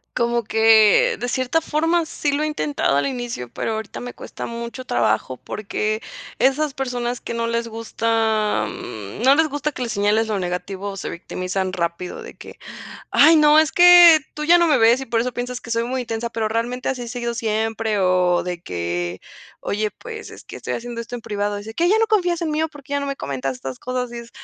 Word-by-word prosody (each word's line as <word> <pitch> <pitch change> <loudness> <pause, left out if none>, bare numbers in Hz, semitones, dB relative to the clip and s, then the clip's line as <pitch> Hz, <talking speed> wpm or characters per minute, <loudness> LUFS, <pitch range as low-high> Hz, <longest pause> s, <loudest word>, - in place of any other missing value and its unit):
Como 235 0 +1
que 225 - +5
de 245 - -3
cierta 260 +6 0
forma, 325 +2 0
sí 290 -2 -2
lo 300 +2 0
he - - +1
intentado 150 - 0
al 140 - +1
inicio, 240 - -5
pero - - -3
ahorita 220 -1 -5
me 245 0 -7
cuesta - - -8
mucho 235 +2 -6
trabajo 120 +2 0
porque 215 +1 -3 0.3
esas 275 +2 +1
personas 245 -2 -3
que - - -6
no 230 0 -1
les 230 0 -1
gusta, 225 -1 0
am, 110 - -7
no 270 +2 +7
les 320 +1 +3
gusta 290 +1 -2
que 255 - -8
le 240 - -2
señales 210 +2 +1
lo 210 -2 -1
negativo 190 +2 -4
se - - -5
victimizan 185 +2 -4
rápido 170 0 -3
de - - -10
que: - - -13 0.5
"Ay, 320 +2 +6
no, 300 0 +6
es 315 0 +4
que 350 -2 +8
tú 300 - -5
ya 345 +2 +6
no 340 -1 +4
me 295 -5 +3
ves 235 +4 +4
y - - -4
por 230 0 0
eso 250 +2 -1
piensas 245 +1 -4
que 230 - -11
soy 230 0 0
muy 255 +1 -2
intensa, 230 0 -4
pero 225 -1 -1
realmente 240 +3 -2
así 255 -2 -2
he 235 - -6
sido 235 -1 -3
siempre", 220 -1 -1
o 180 -1 +2
de 175 -1 -5
que: 85 0 -3 0.4
"Oye, 210 +1 -2
pues, 445 - -9
es - - -12
que - - -10
estoy - - -5
haciendo 235 0 -5
esto 240 - -9
en - - -8
privado", 205 -1 -2
dice: 220 +2 -8
"¿Qué 340 - +1
ya 440 - +4
no 450 - +3
confías 355 -6 +1
en 325 -2 -1
mí 305 +1 0
o 320 - 0
por 290 -2 -14
qué 280 - -11
ya 285 - +1
no - - -3
me 275 0 -3
comentas 135 -1 -3
estas 130 0 -7
cosas?", 250 -1 -3
y 240 - -8
es 235 0 -13
235 Hz, 225 wpm, -21 LUFS, 205-275 Hz, 0.5 s, que